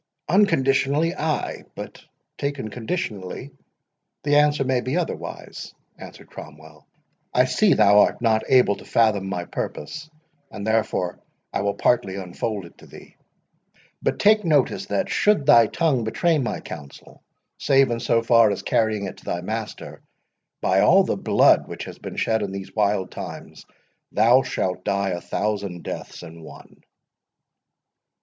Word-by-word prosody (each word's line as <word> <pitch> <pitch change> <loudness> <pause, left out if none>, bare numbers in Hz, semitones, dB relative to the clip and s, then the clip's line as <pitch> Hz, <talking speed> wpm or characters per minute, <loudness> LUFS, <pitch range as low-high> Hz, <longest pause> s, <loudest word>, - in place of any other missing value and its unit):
"Unconditionally, 150 -4 +2
ay—but, 155 -4 -5 0.3
taken 140 -6 -4
conditionally, 110 - -5 0.7
the 145 0 +3
answer 150 -1 +3
may 130 -1 0
be 130 +7 -2
otherwise,"—answered 175 - -7
Cromwell. 75 -1 -13 0.5
"I 125 - +5
see 185 +10 +3
thou 105 -1 +5
art - - +3
not 110 -2 +2
able 125 -6 +4
to - - -13
fathom 105 -4 +1
my 90 -3 -3
purpose, 155 - -6 0.4
and 100 - -7
therefore 110 -5 -1 0.3
I - - -1
will 100 0 -1
partly 115 -6 +1
unfold 100 +2 -4
it 85 - -17
to - - -15
thee.—But - - -9
take 210 +1 +4
notice, 150 -6 +1
that, 100 - -1
should 210 -9 +2
thy 120 -6 +6
tongue 140 -3 0
betray 160 +8 +1
my 125 - -3
counsel, 70 -2 -11 0.4
save 135 -2 +3
in 115 - -1
so 115 0 +1
far 115 -2 +5
as 100 - -3
carrying 110 -3 0
it 95 - -7
to - - -18
thy 85 - -3
master, 110 +3 -6 0.6
by - - +2
all - - +5
the - - -1
blood - - +3
which - - -7
has - - -10
been - - -8
shed 110 -1 0
in 100 -2 -3
these 95 -1 -7
wild 105 -3 0
times, - - -9 0.4
thou 120 +5 +5
shalt 90 -7 -3
die 100 0 0
a 90 -1 -3
thousand 100 -4 -3
deaths - - -7
in 80 +1 -11
one!" 80 - -14
110 Hz, 145 wpm, -23 LUFS, 100-140 Hz, 0.7 s, thy